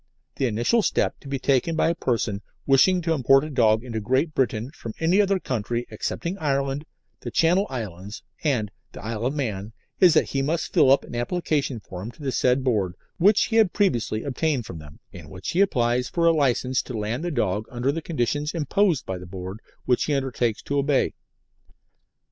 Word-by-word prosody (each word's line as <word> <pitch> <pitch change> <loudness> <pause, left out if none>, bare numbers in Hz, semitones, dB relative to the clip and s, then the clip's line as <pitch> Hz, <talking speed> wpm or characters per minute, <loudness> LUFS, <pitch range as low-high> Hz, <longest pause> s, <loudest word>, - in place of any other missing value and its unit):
The 135 - +1
initial 120 - +2
step - - 0
to - - -13
be 135 0 -2
taken 135 +4 +1
by 160 - +2
a - - +2
person 115 -8 -1 0.2
wishing 175 +7 +4
to 165 0 +1
import 135 -1 +4
any 155 -1 -6
dog 110 -2 +3
into 115 -3 -4
Great 130 +9 0
Britain 120 -1 -1
from 115 -7 -8
any 175 +5 +4
other 195 -1 +1
country 120 - -2
excepting 180 +4 -4
Ireland, 140 -1 -1 0.3
the - - -6
Channel 180 +5 +3
Islands, 105 -4 -6 0.2
and 120 -9 0 0.2
the - - -9
Isle 115 +1 -2
of 135 - -3
Man, 110 -6 -3 0.3
is 175 -4 +6
that - - +2
he 135 - 0
must 160 +4 -2
fill - - +5
up 140 - +4
an - - -11
application 140 0 -1
form 95 +1 -8
to 145 - -13
the 135 - -1
said 125 +1 +2
Board, 100 -8 0 0.2
which 200 +4 +5
he 225 - 0
has 220 -2 +6
previously 120 - 0
obtained 140 -2 -1
from 90 -5 -8
them, 75 -1 -13
in - - -11
which 90 0 -7
he 180 - +2
applies 125 -9 +1
for 170 -1 0
a 165 - +7
licence 130 -3 +1
to 125 - -6
land 110 +7 -2
the 175 - -1
dog 110 - -1
under 125 +2 -1
the 165 +3 -4
conditions 150 +1 -2
imposed 165 0 +1
by 95 -1 -4
the 90 - -10
Board, 95 +2 -7 0.3
which 125 -1 +2
he 150 - 0
undertakes 125 -4 -1
to 140 0 -1
obey. 140 -1 +1
130 Hz, 200 wpm, -24 LUFS, 115-155 Hz, 0.3 s, a